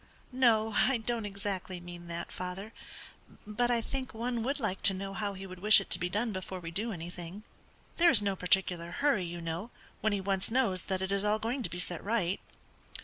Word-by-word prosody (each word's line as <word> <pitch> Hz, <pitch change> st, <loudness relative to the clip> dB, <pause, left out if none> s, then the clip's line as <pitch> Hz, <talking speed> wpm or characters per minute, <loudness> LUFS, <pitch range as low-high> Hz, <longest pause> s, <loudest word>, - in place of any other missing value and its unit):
"No, 225 Hz, -4 st, +3 dB
I 265 Hz, -1 st, +4 dB
don't 225 Hz, -1 st, -2 dB
exactly 195 Hz, -2 st, -4 dB
mean 175 Hz, 0 st, -10 dB
that, 170 Hz, 0 st, -5 dB
father; 185 Hz, +4 st, -6 dB, 0.7 s
but 215 Hz, +4 st, 0 dB
I 240 Hz, -1 st, +2 dB
think 260 Hz, +1 st, -5 dB
one 235 Hz, +1 st, -2 dB
would 275 Hz, +5 st, -1 dB
like 205 Hz, -6 st, -2 dB
to 195 Hz, -, +7 dB
know 195 Hz, +1 st, -5 dB
how 200 Hz, 0 st, -3 dB
he 190 Hz, +1 st, -7 dB
would 185 Hz, -1 st, -9 dB
wish 210 Hz, +3 st, +8 dB
it 195 Hz, -, -7 dB
to -, -, +4 dB
be 180 Hz, -, -1 dB
done 215 Hz, +4 st, 0 dB
before 185 Hz, -1 st, -5 dB
we 165 Hz, -2 st, -7 dB
do 215 Hz, +7 st, -1 dB
anything. 175 Hz, +2 st, -7 dB, 0.5 s
There 345 Hz, 0 st, +6 dB
is 250 Hz, -, +7 dB
no 200 Hz, -2 st, 0 dB
particular 180 Hz, -2 st, +2 dB
hurry, 275 Hz, -11 st, +2 dB
you 170 Hz, 0 st, -6 dB
know, 165 Hz, +7 st, -4 dB, 0.3 s
when 220 Hz, -, +1 dB
he 205 Hz, -, 0 dB
once 195 Hz, 0 st, -1 dB
knows 225 Hz, -7 st, +1 dB
that 190 Hz, -1 st, -1 dB
it 190 Hz, -, -2 dB
is 200 Hz, 0 st, +1 dB
all 210 Hz, +1 st, +2 dB
going 235 Hz, +5 st, -2 dB
to -, -, -2 dB
be 175 Hz, -, -6 dB
set 175 Hz, -1 st, -4 dB
right." 200 Hz, -4 st, 0 dB
195 Hz, 215 wpm, -31 LUFS, 180-225 Hz, 0.7 s, wish